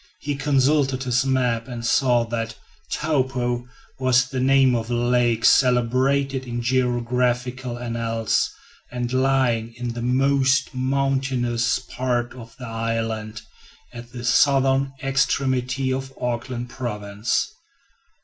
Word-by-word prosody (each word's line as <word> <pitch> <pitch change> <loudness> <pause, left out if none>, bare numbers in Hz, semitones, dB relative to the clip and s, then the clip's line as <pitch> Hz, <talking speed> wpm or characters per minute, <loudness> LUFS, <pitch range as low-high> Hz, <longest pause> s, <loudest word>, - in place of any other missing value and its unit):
He 145 -3 -3
consulted 135 -1 +2
his 125 +1 +1
map 125 -3 0
and 120 -2 -6
saw 120 -1 +3
that 115 -1 -4 0.4
"Taupo" 130 -5 -1 0.3
was 130 0 +3
the 130 0 -4
name 135 0 +4
of 115 -1 -2
a 120 - 0
lake 120 -1 +1
celebrated 130 +2 +3
in 120 0 -3
geographical 125 0 0
annals, 115 -2 -1 0.4
and 125 0 -3
lying 130 -4 +1
in 125 0 -4
the 120 - -5
most 135 +2 +2
mountainous 130 -3 0
part 120 -1 -2
of 115 -3 -12
the 130 - -8
island, 115 -1 -3 0.5
at 120 0 -10
the 120 0 -7
southern 135 +1 +3
extremity 135 -1 0
of 135 0 -4
Auckland 120 0 -3
province. 105 -3 -2
125 Hz, 115 wpm, -23 LUFS, 120-130 Hz, 0.5 s, name